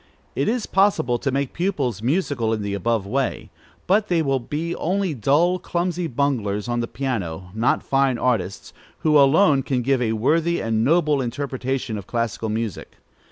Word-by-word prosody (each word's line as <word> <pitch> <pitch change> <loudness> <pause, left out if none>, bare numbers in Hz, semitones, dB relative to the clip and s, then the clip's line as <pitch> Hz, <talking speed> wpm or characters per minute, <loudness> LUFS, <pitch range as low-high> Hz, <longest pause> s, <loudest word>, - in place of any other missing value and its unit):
It 140 - 0
is 235 -1 -1
possible 190 -11 +2
to 140 - -1
make 140 0 -1
pupils 145 - -1
musical 130 -4 0
in 110 -2 -2
the 100 0 -3
above 110 +1 0
way, 115 -2 -2 0.3
but 205 +3 +2
they 170 -4 +1
will 135 -2 +1
be 155 +7 -4
only 190 0 0
dull, 150 - +2
clumsy 175 0 -2
bunglers 120 -7 -1
on 120 0 -1
the 115 - -1
piano; 95 -11 -4
not 110 +3 +1
fine 135 -2 +1
artists, 110 -7 -1 0.3
who 155 -1 +3
alone 145 +1 +5
can 125 -2 -1
give 135 0 +1
a 110 -2 +1
worthy 165 +9 +1
and 110 -1 0
noble 150 0 +3
interpretation 130 -2 -3
of 100 - -11
classical 115 -2 -2
music. 110 -3 -4
135 Hz, 165 wpm, -22 LUFS, 115-160 Hz, 0.3 s, alone